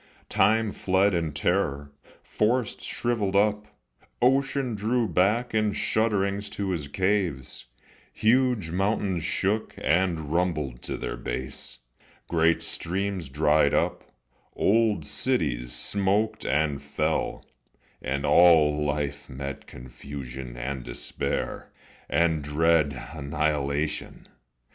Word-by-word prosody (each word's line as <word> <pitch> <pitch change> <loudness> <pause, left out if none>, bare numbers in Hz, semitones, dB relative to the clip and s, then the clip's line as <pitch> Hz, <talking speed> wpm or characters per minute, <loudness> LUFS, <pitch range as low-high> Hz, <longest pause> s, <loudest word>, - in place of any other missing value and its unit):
Time 105 +1 +3
fled 95 +1 +2
in 85 -3 0
terror, 75 -2 -1 0.3
forests 115 +1 0
shrivelled 110 -5 -1
up, 105 +1 +2 0.5
Ocean 135 0 +2
drew 115 +3 0
back 105 +8 +1
in 110 -1 +2
shudderings 100 -2 0
to 100 -2 -3
his 80 -6 -3
caves, 90 -5 -1 0.5
Huge 115 -6 +2
mountains 95 -2 0
shook 100 +6 -1
and 80 -3 0
rumbled 75 -8 -1
to - - -4
their - - -4
base, 65 +2 -5 0.5
Great 85 0 +2
streams 95 -2 -3
dried 75 +1 +3
up, - - 0 0.5
old 105 -6 +2
cities 70 - -1
smoked 100 - 0
and 75 -1 +1
fell, 75 +2 -2 0.6
And 70 +3 -2
all 75 -4 +5
life 75 -1 -2
met 70 +1 -6
confusion 65 0 -8
and 65 +1 -4
despair, - - -4 0.4
And 80 -3 +2
dread 75 -2 +2
annihilation. 75 0 -2
85 Hz, 100 wpm, -26 LUFS, 70-105 Hz, 0.6 s, all